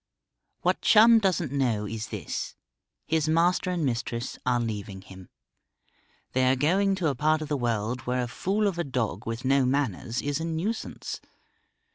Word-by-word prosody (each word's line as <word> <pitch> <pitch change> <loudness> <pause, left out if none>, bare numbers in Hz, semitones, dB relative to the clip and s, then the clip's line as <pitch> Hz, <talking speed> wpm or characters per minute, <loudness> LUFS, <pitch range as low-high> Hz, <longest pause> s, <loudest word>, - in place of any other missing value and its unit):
What - - +1
Chum 225 +1 +7
doesn't 180 - 0
know 120 -7 0
is 110 +1 -5
this: - - -5 0.5
his 160 -1 +1
master 175 +3 +2
and 175 -4 0
mistress 120 -1 -2
are 125 -1 +3
leaving 105 -4 -4
him. 95 -2 -13 1.0
They 130 0 +3
are - - +3
going 190 +8 +2
to 175 -5 0
a - - 0
part 155 +4 +1
of 155 - -8
the 150 - +1
world 120 -1 -1
where 125 0 0
a - - -3
fool 195 - -1
of 190 -4 0
a - - +1
dog 120 - -3
with 115 +2 -4
no 135 +1 +4
manners 130 -3 -1
is 145 +1 -1
a 165 - -3
nuisance. 170 +8 -4
135 Hz, 170 wpm, -27 LUFS, 120-165 Hz, 1.0 s, Chum